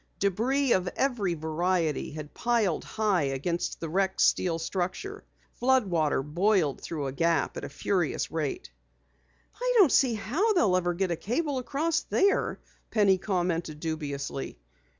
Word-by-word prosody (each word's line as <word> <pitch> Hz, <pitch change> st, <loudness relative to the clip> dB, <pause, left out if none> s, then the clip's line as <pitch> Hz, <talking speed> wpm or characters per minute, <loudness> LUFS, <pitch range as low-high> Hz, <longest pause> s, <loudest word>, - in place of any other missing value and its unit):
Debris 240 Hz, +8 st, +1 dB
of 185 Hz, -1 st, +1 dB
every 225 Hz, -10 st, 0 dB
variety 160 Hz, 0 st, -1 dB
had 150 Hz, -1 st, -8 dB
piled 230 Hz, -8 st, +1 dB
high 210 Hz, -5 st, 0 dB
against 145 Hz, +5 st, -2 dB
the 165 Hz, -, -4 dB
wrecked 190 Hz, +3 st, 0 dB
steel 170 Hz, -3 st, +3 dB
structure. 185 Hz, -, -4 dB, 0.3 s
Flood 260 Hz, -1 st, +2 dB
water 155 Hz, -7 st, +1 dB
boiled 170 Hz, 0 st, +1 dB
through 155 Hz, -4 st, -4 dB
the 135 Hz, -, -2 dB
gap 165 Hz, +2 st, +1 dB
at -, -, -6 dB
a -, -, -5 dB
furious 175 Hz, +3 st, -1 dB
rate. 150 Hz, -, -3 dB, 0.9 s
"I -, -, +1 dB
don't 370 Hz, -, +7 dB
see 260 Hz, -4 st, +4 dB
how 310 Hz, -, +1 dB
they'll 215 Hz, -, +3 dB
ever 175 Hz, -1 st, 0 dB
get 190 Hz, 0 st, 0 dB
a -, -, +1 dB
cable 270 Hz, -, -1 dB
across 310 Hz, +6 st, 0 dB
there," 400 Hz, 0 st, +1 dB, 0.3 s
Penny 195 Hz, -4 st, +3 dB
commented 175 Hz, -5 st, -1 dB
dubiously. 145 Hz, -, -4 dB
185 Hz, 145 wpm, -28 LUFS, 160-240 Hz, 0.9 s, don't